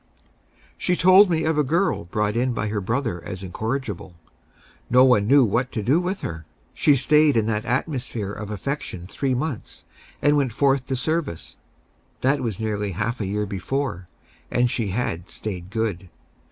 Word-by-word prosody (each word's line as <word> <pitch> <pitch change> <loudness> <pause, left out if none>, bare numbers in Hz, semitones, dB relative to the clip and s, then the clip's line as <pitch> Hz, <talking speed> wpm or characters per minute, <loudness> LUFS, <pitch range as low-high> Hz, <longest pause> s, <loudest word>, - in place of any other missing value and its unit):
She 180 - +1
told 185 +3 +7
me 160 -2 +1
of 160 -1 +1
a - - +4
girl 170 - 0
brought 105 +4 -1
in 125 +1 +1
by 105 -2 -2
her 105 -1 -2
brother 115 -4 -2
as 90 +1 -6
incorrigible. 110 0 -4 0.8
No 125 +2 +6
one 105 -6 +4
knew 135 +1 +6
what 125 +5 0
to 110 - -2
do 140 - +3
with 185 +2 -3
her. 80 -1 -5 0.3
She 145 - +4
stayed 150 +1 +4
in 110 - +2
that 110 0 -1
atmosphere 125 -5 -2
of 105 0 -7
affection 105 -4 -4
three 130 +7 -1
months, 130 -2 -4 0.3
and 145 0 +3
went 135 -5 0
forth 135 0 +2
to 135 - -1
service. 155 - -2 0.7
That 135 +3 +2
was 115 -6 -3
nearly 105 -3 -2
half 115 +7 -2
a 100 - -2
year 105 +2 -1
before, 100 -1 -3 0.4
and 120 0 +2
she 115 - -1
had 95 -4 -3
"stayed 95 -4 -6
good." 100 -4 -2
120 Hz, 170 wpm, -23 LUFS, 105-140 Hz, 0.8 s, told